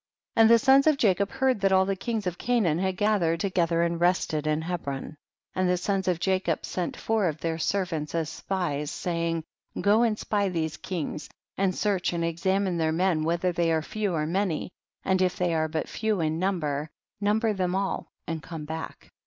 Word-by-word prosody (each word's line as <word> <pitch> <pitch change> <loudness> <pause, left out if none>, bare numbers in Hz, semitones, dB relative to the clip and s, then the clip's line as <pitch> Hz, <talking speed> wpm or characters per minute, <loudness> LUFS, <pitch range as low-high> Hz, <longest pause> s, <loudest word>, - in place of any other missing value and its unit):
34. - - +5
And 225 - +7
the 235 - +8
sons 275 +2 +6
of 305 -2 +5
Jacob 200 -4 +2
heard 265 -4 +1
that 195 -1 +3
all 190 0 +5
the 195 0 0
kings 220 +1 -3
of 180 -1 -3
Canaan 215 -10 +1
had 190 0 -1
ga 210 0 +2
thered 165 -1 +1
together 170 -2 +1
and 170 0 -1
rested 165 -4 +1
in 155 +1 +1
Hebron, 155 -4 -4 0.4
and 185 -1 +1
the 180 - +2
sons 190 +1 -1
of 180 -2 +1
Jacob 185 -3 0
sent 180 -2 -3
four 220 -4 +1
of 155 -2 -2
their 165 -1 -2
servants 165 -5 -1
as 165 -2 0
spies, 155 -4 -2
saying, 165 -1 -2 0.4
go 205 +4 +4
and 225 -3 +2
spy 205 -2 0
these 160 -3 -2
kings, 160 -4 -4 0.3
and 190 -2 +1
search 195 -4 0
and 170 -1 0
examine 185 +2 0
their 160 -1 +1
men 165 -1 +1
whether 170 +3 +1
they 170 -1 +1
are 160 -1 +1
few 210 +1 -2
or 155 -1 0
many, 180 0 -1 0.3
and 190 0 +2
if 180 -1 +2
they 175 -2 +1
are 160 -1 +1
but 155 0 -3
few 220 -3 -1
in 160 0 0
number, 155 -6 -1 0.3
number 215 +2 +2
them 185 -2 -1
all 195 0 -1 0.2
and 165 -1 -4
come 155 +1 -7
back. 160 +1 -7
180 Hz, 200 wpm, -27 LUFS, 165-195 Hz, 0.4 s, the